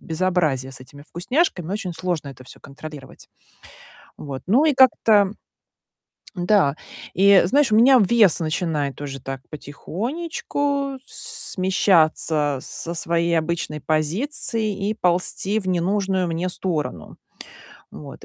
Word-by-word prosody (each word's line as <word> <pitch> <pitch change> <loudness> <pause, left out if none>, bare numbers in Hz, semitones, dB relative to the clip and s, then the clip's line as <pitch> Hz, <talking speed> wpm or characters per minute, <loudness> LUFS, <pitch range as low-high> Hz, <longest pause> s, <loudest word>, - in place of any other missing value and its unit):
безобразие 160 -6 -1
с 130 - -9
этими 140 +2 -13
вкусняшками, 185 - -1
очень 200 -4 -4
сложно 165 -2 -3
это 130 -1 -11
всё - - -12
контролировать. 140 -1 -11 0.9
Вот. 135 -2 -7
Ну, 250 +11 +4
и 305 - +3
как-то 220 -6 +4 1.0
Н-да. 175 -5 +2 0.4
И 195 +1 +6
знаешь, 265 +4 +2
у - - +5
меня 255 +4 +7
вес 210 -3 +4
начинает 155 -4 -2
уже 135 -2 -6
так 135 0 -6
потихонечку 275 - -3
с - - -8
смещаться 160 -6 +2
со 170 - -6
своей 170 0 0
обычной 160 -2 -3
позиции 205 - -1
и - - 0
ползти 190 +2 0
в 190 - -8
ненужную 185 +1 0
мне 170 +2 -2
сторону. 155 - -4 0.7
Вот. 140 -2 -11
175 Hz, 120 wpm, -22 LUFS, 155-210 Hz, 1.0 s, меня